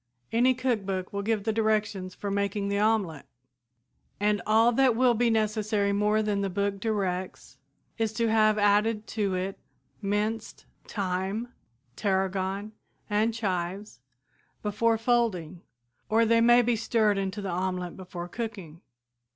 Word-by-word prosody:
Any 250 +3 +3
cookbook 200 -8 -2
will 200 - -2
give 215 0 0
the 220 0 0
directions 210 -4 0
for 200 - -4
making 200 0 -1
the 200 0 0
omelette, 205 -9 0 0.9
and 205 -1 +1
all 225 +2 +5
that 255 -1 +3
will 250 0 +4
be 235 +1 +2
necessary 215 -2 +1
more 210 +1 +2
than 205 -1 0
the 195 - -1
book 200 +1 -1
directs 190 -4 -3 0.4
is 225 -1 +1
to 230 +1 0
have 215 -1 +4
added 210 +1 +2
to 200 -4 -1
it 190 +2 -3 0.4
minced 210 +2 -2 0.2
thyme, 195 +4 -2 0.5
tarragon 195 +1 -1 0.4
and 215 +2 +2
chives 190 - -3 0.6
before 225 +2 +1
folding, 215 -8 0 0.5
or 225 +2 +4
they 230 +1 +4
may 240 +1 +6
be 240 0 +2
stirred 215 -2 +1
into 195 +1 -3
the 200 -2 -4
omelette 180 0 -2
before 180 -2 -7
cooking. 190 -6 -6
210 Hz, 135 wpm, -27 LUFS, 195-225 Hz, 0.9 s, may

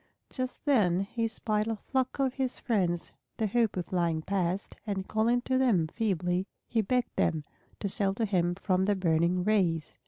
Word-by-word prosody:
Just 255 +1 -4
then 200 - +3
he 225 +3 -1
spied 215 -1 -1
a 225 - 0
flock 260 +4 -2
of 270 -2 +1
his 265 -2 -2
friends 180 -7 0 0.3
the 220 - 0
Hoopoes 215 -4 +1
flying 170 -3 0
past, 190 0 -1
and 195 -2 -2
calling 230 +3 +2
to 260 +1 0
them 195 -12 +3
feebly 185 -3 0 0.2
he 225 - +1
begged 245 +4 0
them 155 -2 +1 0.4
to 200 - 0
shelter 195 +3 0
him 175 -4 +1
from 190 0 +1
the 205 0 +2
burning 175 0 +2
rays. 180 -7 +1
200 Hz, 165 wpm, -29 LUFS, 180-230 Hz, 0.4 s, then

